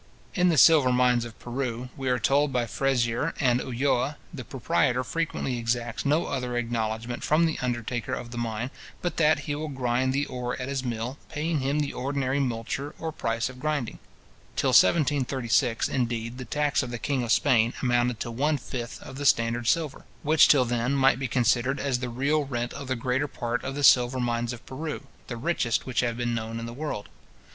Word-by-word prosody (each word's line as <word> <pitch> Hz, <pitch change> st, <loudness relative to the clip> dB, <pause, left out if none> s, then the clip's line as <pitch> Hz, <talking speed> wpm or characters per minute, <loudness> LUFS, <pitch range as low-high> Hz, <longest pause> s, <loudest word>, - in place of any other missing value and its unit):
In 180 Hz, -2 st, +3 dB
the 165 Hz, -, +2 dB
silver 145 Hz, -4 st, +7 dB
mines 125 Hz, -1 st, +3 dB
of 115 Hz, -1 st, -10 dB
Peru, 125 Hz, 0 st, -4 dB
we 135 Hz, -3 st, -3 dB
are 125 Hz, -, +2 dB
told 140 Hz, +5 st, +2 dB
by 125 Hz, -2 st, +1 dB
Frezier 125 Hz, +3 st, 0 dB
and 125 Hz, -3 st, +3 dB
Ulloa, 130 Hz, +3 st, 0 dB, 0.2 s
the 135 Hz, -5 st, -6 dB
proprietor 125 Hz, -, 0 dB
frequently 135 Hz, -2 st, -2 dB
exacts 120 Hz, +2 st, -2 dB
no 150 Hz, +4 st, +2 dB
other 125 Hz, -3 st, -2 dB
acknowledgment 115 Hz, 0 st, -2 dB
from 155 Hz, +3 st, +3 dB
the 160 Hz, -, -1 dB
undertaker 120 Hz, 0 st, -2 dB
of 120 Hz, -, -7 dB
the 120 Hz, -, -7 dB
mine, 115 Hz, +2 st, -3 dB, 0.3 s
but 175 Hz, -, -2 dB
that 155 Hz, -1 st, +3 dB
he 145 Hz, -, -3 dB
will 155 Hz, +2 st, -3 dB
grind 130 Hz, -2 st, 0 dB
the 140 Hz, +2 st, 0 dB
ore 125 Hz, -1 st, -4 dB
at 130 Hz, +1 st, -4 dB
his 135 Hz, -2 st, -2 dB
mill, 120 Hz, +2 st, -4 dB
paying 155 Hz, +1 st, -1 dB
him 140 Hz, +2 st, 0 dB
the 145 Hz, -, -2 dB
ordinary 135 Hz, +1 st, -1 dB
multure 135 Hz, +3 st, -3 dB
or 160 Hz, -1 st, -4 dB
price 115 Hz, -6 st, -1 dB
of 130 Hz, 0 st, -10 dB
grinding. 145 Hz, -5 st, -2 dB, 0.6 s
Till -, -, +1 dB
1736, 130 Hz, -, +3 dB
indeed, 120 Hz, -1 st, -2 dB
the 125 Hz, -, -5 dB
tax 145 Hz, +4 st, +1 dB
of 130 Hz, -, -5 dB
the 120 Hz, -, -4 dB
king 135 Hz, +2 st, -1 dB
of 120 Hz, -1 st, -2 dB
Spain 115 Hz, -1 st, +3 dB
amounted 120 Hz, -2 st, +1 dB
to 120 Hz, -, -3 dB
one 145 Hz, +6 st, +1 dB
fifth 120 Hz, -2 st, -6 dB
of 135 Hz, -, -9 dB
the 145 Hz, -, -4 dB
standard 115 Hz, 0 st, +2 dB
silver, 155 Hz, -2 st, 0 dB, 0.2 s
which 155 Hz, 0 st, +6 dB
till 135 Hz, -4 st, +5 dB
then 120 Hz, +2 st, 0 dB
might 135 Hz, -2 st, +4 dB
be 135 Hz, -, -1 dB
considered 125 Hz, +2 st, +1 dB
as 130 Hz, -3 st, 0 dB
the 125 Hz, 0 st, -3 dB
real 140 Hz, +5 st, +1 dB
rent 120 Hz, -3 st, -3 dB
of 140 Hz, -, -7 dB
the 130 Hz, -, 0 dB
greater 125 Hz, +4 st, 0 dB
part 120 Hz, -2 st, -3 dB
of 135 Hz, -, -4 dB
the 145 Hz, -, -3 dB
silver 125 Hz, -1 st, +5 dB
mines 120 Hz, -1 st, -1 dB
of 120 Hz, 0 st, -9 dB
Peru, 150 Hz, +3 st, -5 dB, 0.2 s
the 120 Hz, -, -5 dB
richest 125 Hz, -3 st, 0 dB
which 125 Hz, -3 st, -1 dB
have 120 Hz, -1 st, 0 dB
been 120 Hz, -1 st, -1 dB
known 115 Hz, 0 st, -3 dB
in 115 Hz, -, -5 dB
the 115 Hz, -, -7 dB
world. 140 Hz, -6 st, -4 dB
125 Hz, 200 wpm, -26 LUFS, 120-140 Hz, 0.6 s, silver